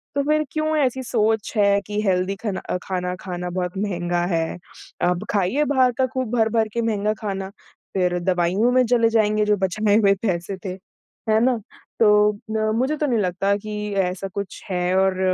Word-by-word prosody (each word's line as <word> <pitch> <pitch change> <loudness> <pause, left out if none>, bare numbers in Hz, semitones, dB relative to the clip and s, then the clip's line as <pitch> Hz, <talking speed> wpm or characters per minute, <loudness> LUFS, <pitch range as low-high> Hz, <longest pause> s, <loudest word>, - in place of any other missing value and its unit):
तो 285 - +2
फिर 305 +2 +2
क्यों 310 0 0
ऐसी 260 -2 +1
सोच 220 -3 0
है 200 -1 +4
कि 210 +1 -3
हेल्दी 185 +1 +1
खना 205 -4 -2
अ, - - 0
खाना 180 -1 -3
खाना 180 -1 -4
बहुत 180 +1 -3
महँगा 175 -3 -1
है। 165 0 -1 0.5
अब 180 +2 -1
खाइए 205 +8 +1
बाहर 260 -3 +3
का 260 - +3
खूब 255 -4 -2
भर-भर 225 0 +2
के 235 - 0
महँगा 215 -2 0
खाना, 195 -2 -3 0.4
फिर 180 -2 +1
दवाइयों 185 +5 +1
में 255 0 +4
चले 230 -1 +3
जाएँगे 215 -1 +2
जो 210 0 +3
बचाए 205 +2 +1
हुए 200 -3 +5
पैसे 185 -2 -2
थे, 185 -1 -4 0.5
है 215 0 +4
ना? 255 -2 +2 0.4
तो 210 -1 +5
अ, 215 +1 -2
मुझे 260 +6 +1
तो 300 - 0
नहीं 245 -4 +1
लगता 195 +1 +1
कि 210 0 -5
ऐसा 180 +2 -3
कुछ 200 -1 -5
है 180 0 0
और 190 -1 +2
205 Hz, 185 wpm, -22 LUFS, 185-225 Hz, 0.5 s, हुए